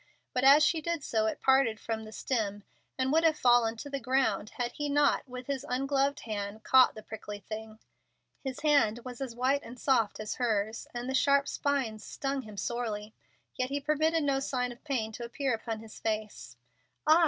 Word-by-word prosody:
But 250 - 0
as 285 +3 +8
she 320 0 +1
did 335 -1 -2
so 220 -3 +1
it 220 - -3
parted 265 -5 +4
from 220 -1 -4
the 215 - -10
stem, 210 -3 -2 0.3
and 260 0 +1
would 325 +2 +4
have 315 -2 +4
fallen 240 -3 +4
to 255 - -7
the 275 -1 -3
ground 250 -5 +1
had 245 -1 -1
he 295 +2 -3
not, 285 -1 +2
with 250 0 -7
his 275 -1 -3
ungloved 275 +2 +1
hand, 210 0 -5
caught 260 -1 +6
the 215 - -9
prickly 210 -1 -7
thing. 220 +2 -7 0.7
His 265 -2 -5
hand 285 -7 +3
was 250 0 -7
as 255 -4 -4
white 265 +3 +2
and 245 +2 -11
soft 230 -7 +2
as 215 0 -4
hers, 220 -2 0
and 240 +1 -5
the 265 - -2
sharp 280 +1 +3
spines 255 -7 -1
stung 275 0 -3
him 215 -4 -11
sorely, 220 -2 -3 0.4
yet 255 0 -2
he 285 +1 -1
permitted 310 +2 +1
no 275 -1 +2
sign 250 -2 -1
of 240 - -13
pain 245 -7 -1
to 240 +2 -7
appear 255 +2 -1
upon 225 -1 -4
his 225 -1 -11
face. 215 - -4 0.5
"Ah!" 315 +2 +7
250 Hz, 200 wpm, -30 LUFS, 220-275 Hz, 0.7 s, as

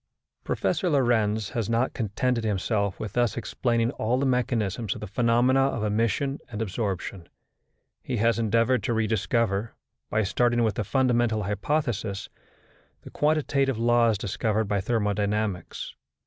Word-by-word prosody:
Professor 185 - 0
Lorentz 110 - +2
has 115 -4 -2
not 115 +3 +1
contented 115 +2 -1
himself 100 -1 -1
with 105 -2 -5
thus 120 -1 +1
explaining 120 0 0
all 120 -1 0
the 140 - 0
mechanism 120 -4 0
of - - -7
the - - -5
phenomena 120 +5 +2
of 135 -5 -1
emission 115 +6 0
and 110 -3 -6
absorption. 95 -4 -3 0.7
He 125 - -3
has 115 +2 +2
endeavoured 115 +3 +2
to 120 - 0
rediscover, 110 -1 0 0.3
by 110 - +1
starting 120 +4 +2
with 110 -2 +1
the 105 - -2
fundamental 120 -2 +1
hypothesis, 105 -1 -2 0.7
the - - -11
quantitative 140 -4 +1
laws 115 -1 +3
discovered 105 +2 -1
by 100 -1 0
thermodynamics. 105 -3 -1
115 Hz, 135 wpm, -26 LUFS, 105-120 Hz, 0.7 s, laws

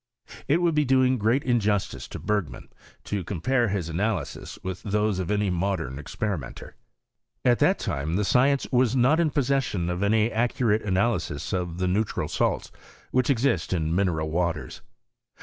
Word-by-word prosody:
It 165 +5 +2
would 170 -1 +3
be 150 0 +3
doing 130 -1 +3
great 115 +6 +2
injustice 105 -5 0
to - - -7
Bergman, 105 -5 -3 0.3
to 100 -3 -3
compare 120 +8 0
his 95 -4 -2
analyses 90 0 -3
with 95 -1 -5
those 105 -1 0
of 90 - -3
any 105 -2 +1
modem 85 -7 -2
experimenter. 80 -1 -5 0.7
At 120 -1 +4
that - - +4
time, 75 +4 -2
the 105 +2 +1
science 135 +5 +3
was 125 -1 +3
not 135 +6 +4
in 165 -2 +3
possession 135 - 0
of 90 +1 -3
any 110 +2 +2
accu 120 +1 0
rate 105 +1 +3
analyses 95 -6 -1
of 90 -2 -2
the 90 0 0
neutral 100 +4 0
salts, - - -1 0.4
which 130 +2 +1
exist 115 - +1
in 80 -2 0
mineral 85 -4 0
waters. 85 -1 -2
105 Hz, 160 wpm, -26 LUFS, 90-125 Hz, 0.7 s, At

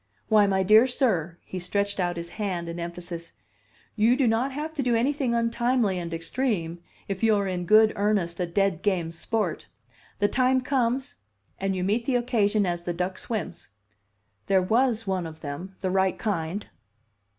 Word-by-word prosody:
Why, 210 -2 +5
my 190 -1 +2
dear 215 +6 +6
sir," 185 - 0
he 185 - -5
stretched 200 +3 -1
out 175 -1 0
his 170 0 -4
hand 185 -5 -3
in 170 +1 -5
emphasis, 170 0 -6 0.6
"you 225 +3 +4
do 270 0 +2
not 235 +4 +1
have 300 +4 -4
to 300 - -2
do 245 -3 +1
anything 260 0 +1
untimely 230 -3 +1
and 170 -1 -5
extreme 170 -1 -2 0.3
if 195 -1 -4
you 225 -1 +4
are 200 -1 0
in 180 -2 -3
good 215 +2 +6
earnest 200 -4 0
a 180 - 0
dead 195 -1 0
game 180 -5 0
sport. 180 +1 -2 0.5
The 205 - +3
time 255 +2 +2
comes, 260 +1 -1 0.4
and 195 0 -1
you 180 - -2
meet 215 +5 0
the 260 - +1
occasion 220 -4 +2
as 175 -1 -2
the 175 0 -3
duck 180 +2 -3
swims. 215 - -5 0.8
There 195 -1 +4
was 225 +4 +1
one 185 -3 -1
of 160 0 -11
them 170 +6 -6
the 185 - -1
right 190 0 +2
kind." 195 -1 -2
200 Hz, 175 wpm, -26 LUFS, 175-230 Hz, 0.8 s, dear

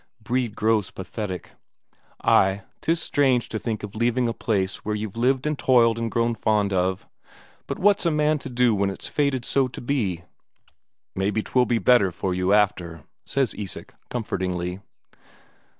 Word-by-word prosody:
Brede 120 -1 -1
grows 110 -2 +1
pathetic. 95 -1 -6 0.7
"Ay, 95 +1 +3 0.2
'tis 165 +1 +1
strange 130 -6 +2
to 110 - -3
think 110 -2 -3
of 105 - -6
leaving 120 +2 +1
a 115 - -1
place 100 -5 -1
where 105 0 -3
you've 105 -1 -5
lived 130 +3 +1
and 150 -1 -1
toiled 115 -3 +4
and 115 0 -1
grown 115 +1 +1
fond 105 -2 +1
of. 95 0 0 0.6
But - - -3
what's 205 +1 +3
a - - +4
man 150 -1 +2
to - - -7
do 125 -2 +3
when 100 -1 +1
it's 95 - -6
fated 140 -4 0
so 135 -2 +2
to 125 - -9
be?" 110 -10 -1 0.9
"Maybe 100 +3 0
'twill 125 -1 +2
be 120 - +2
better 115 -5 +4
for 90 +2 -2
you 90 +1 0
after," 90 -6 +1 0.2
says 135 -3 0
Isak 100 -3 -6 0.2
comfortingly. 90 -6 -3
110 Hz, 165 wpm, -24 LUFS, 95-125 Hz, 0.9 s, toiled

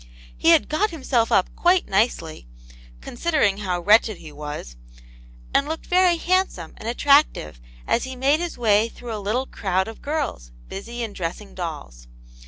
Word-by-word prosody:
He 330 - +2
had 330 -3 +5
got 400 +8 +1
himself 260 -8 0
up 185 - +2
quite 355 +1 +3
nicely, 190 - -1 0.5
considering 240 -8 0
how 180 -4 -2
wretched 215 +1 +4
he 155 - -11
was, 145 - -7 0.8
and 280 - +2
looked 320 +1 -5
very 360 -1 +3
handsome 360 - 0
and 225 - -5
attractive 245 - +2 0.2
as 235 - +1
he 260 0 -6
made 275 +4 +2
his 345 -1 -4
way 220 -1 +3
through 235 0 -8
a 210 - -5
little 225 +6 -1
crowd 190 -5 -1
of 225 - -9
girls, 285 - -3 0.2
busy 235 +5 -6
in 220 -3 -5
dressing 185 +3 -5
dolls. - - -7
225 Hz, 160 wpm, -23 LUFS, 180-295 Hz, 0.8 s, had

